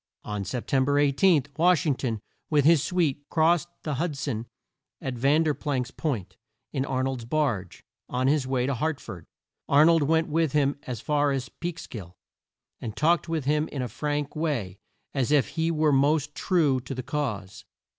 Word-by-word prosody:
On 105 -1 -4
Sep 115 +6 -4
tem 135 -1 +2
ber 140 +2 +1
18, 145 +2 +4
Wash 175 0 +4
ing 150 - +3
ton 115 -5 -3 0.3
with 145 -3 +3
his 160 -2 +6
suite 155 -5 0
crossed 170 +1 +3 0.2
the 150 - -2
Hud 165 -5 -2
son 120 -5 -3 0.5
at 130 - -4
Ver 140 +6 +3
planck's 135 -5 -2
Point, 105 - -3 0.4
in 135 -2 0
Ar 130 -1 -1
nold's 130 -2 -2
barge, 115 - -1 0.3
on 125 +1 -1
his 140 -1 +2
way 130 -2 0
to 140 - 0
Hart 155 +3 -1
ford. 85 -3 -9 0.4
Ar 145 +2 +6
nold 165 -1 +5
went 160 +3 +2
with 160 -2 +1
him 145 -1 +2
as 125 -4 -4
far 145 -1 +1
as 135 -2 -2
Peeks 170 -1 -6
kill, 90 -6 -9 0.6
and 110 -2 -6
talked 165 +2 +2
with 160 -5 -1
him 150 +2 +1
in 135 -3 -4
a - - -2
frank 145 +5 -3
way, 125 - -2 0.3
and 135 - 0
as 130 - 0
if 145 -3 +3
he 165 0 -1
were 155 -2 +2
most 145 +2 +2
true 150 -9 +2
to 130 +2 -7
the 130 - -4
cause. 120 -9 -4
145 Hz, 190 wpm, -26 LUFS, 130-155 Hz, 0.6 s, his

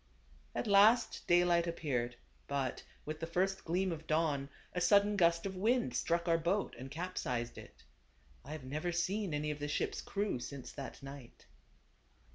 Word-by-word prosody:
At - - -1
last 210 +3 +5
daylight 175 -1 +4
appeared; 125 -8 -1 0.3
but, 135 -3 -1 0.2
with 155 +1 -4
the 165 - -3
first 190 +3 0
gleam 180 +3 0
of 160 -1 -6
dawn, 155 -3 +1 0.2
a 180 - -1
sudden 205 +3 +5
gust 170 -2 +3
of 190 -1 -3
wind 215 - +2
struck 170 +5 0
our 165 -1 +4
boat, 180 +5 0
and 130 +1 -7
capsized 135 -7 -3
it. - - -14 0.6
I 150 - -7
have 155 -3 -7
never 155 +7 -2
seen 185 +3 0
any 150 0 -1
of 150 - -5
the 145 - -2
ship's 145 - -1
crew 205 -9 -2
since 130 +1 -7
that 140 -1 -8
night. 135 -3 -10
165 Hz, 165 wpm, -34 LUFS, 140-185 Hz, 0.6 s, last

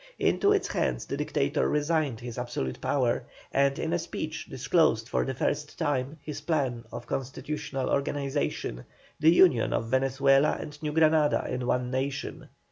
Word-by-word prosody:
Into 405 - +3
its 410 -1 +2
hands - - -1
the - - -3
Dictator 145 0 0
resigned 150 -5 0
his 120 0 -6
absolute 120 - -4
power, - - +1 0.3
and 140 0 +3
in 165 0 -2
a 175 - +1
speech 155 -1 -5
disclosed 125 -5 +2
for - - 0
the 130 - -3
first 145 +3 -2
time 140 +1 -1
his 150 -2 -6
plan 130 -8 -1
of 120 - -7
constitutional 135 +1 -3
organization, 140 - -2 0.3
the 155 - +6
union 165 -8 +5
of 115 - -1
Venezuela 135 +2 +3
and 150 0 -8
New 150 -1 -2
Granada 155 -1 +3
in 125 -1 -2
one 125 0 0
nation. 135 +1 -3
140 Hz, 155 wpm, -28 LUFS, 125-150 Hz, 0.3 s, the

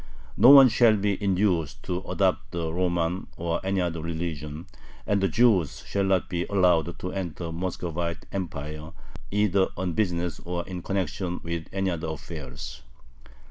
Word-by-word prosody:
No 115 +6 +7
one 135 -1 +11
shall 115 -2 +4
be 100 0 -1
induced 90 -7 +1
to 90 -1 -2
adopt 95 -2 +1
the 80 -2 -2
Roman 90 0 0
or 85 0 -2
any 95 0 0
other 85 -2 -2
religion, 80 -1 -4 0.4
and 100 -1 +1
the 95 - +3
Jews 95 - +2
shall 100 -1 0
not 95 -2 +2
be 85 -2 -2
allowed 90 -4 +2
to 90 - -5
enter 90 -4 -4
the 85 - -4
Muscovite 85 -1 -3
Empire 75 -4 -5 0.4
either 100 -2 +2
on 90 -1 -2
business 90 -4 -1
or 85 0 -3
in 90 -2 -5
connection 95 -1 -2
with 85 -1 -4
any 95 -1 0
other 85 -1 -3
affairs. 75 -5 -7
90 Hz, 155 wpm, -26 LUFS, 85-95 Hz, 0.4 s, one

